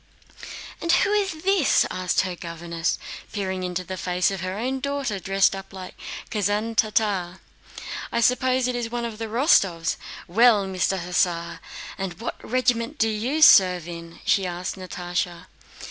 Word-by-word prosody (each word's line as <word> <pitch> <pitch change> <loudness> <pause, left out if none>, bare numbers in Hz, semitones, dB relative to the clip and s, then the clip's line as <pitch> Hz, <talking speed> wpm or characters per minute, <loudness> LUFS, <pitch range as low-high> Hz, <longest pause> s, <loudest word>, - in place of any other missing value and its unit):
"And 335 - +1
who 395 +4 +3
is 385 -6 -1
this?" 385 -6 +3
she - - +2
asked 185 -1 +1
her 185 -2 -3
governess, 170 0 -3 0.3
peering 190 -2 -3
into 180 0 -3
the 185 +1 -6
face 180 +2 0
of 195 -2 -4
her 185 +1 -3
own 260 +4 -2
daughter 275 -6 -2
dressed 195 +2 +2
up 195 0 -9
as - - -7
a 185 -1 -8 0.4
Kazán 210 +2 0
Tartar. 205 -5 +1 0.7
"I - - 0
suppose 255 +1 +2
it 250 - -1
is 240 -1 -2
one 240 0 -3
of 225 -2 -6
the 225 - -3
Rostóvs! 200 - +2 0.3
Well, 215 +1 +5
Mr. 190 0 0
Hussar, 170 -1 0 0.4
and 190 -1 -4
what 235 - -6
regiment 245 +2 0
do 225 - +2
you 245 +9 0
serve 180 - +7
in?" 170 -1 -9
she 195 -2 +2
asked 180 +1 -4
Natásha. 175 -2 -4
195 Hz, 160 wpm, -24 LUFS, 180-240 Hz, 0.7 s, serve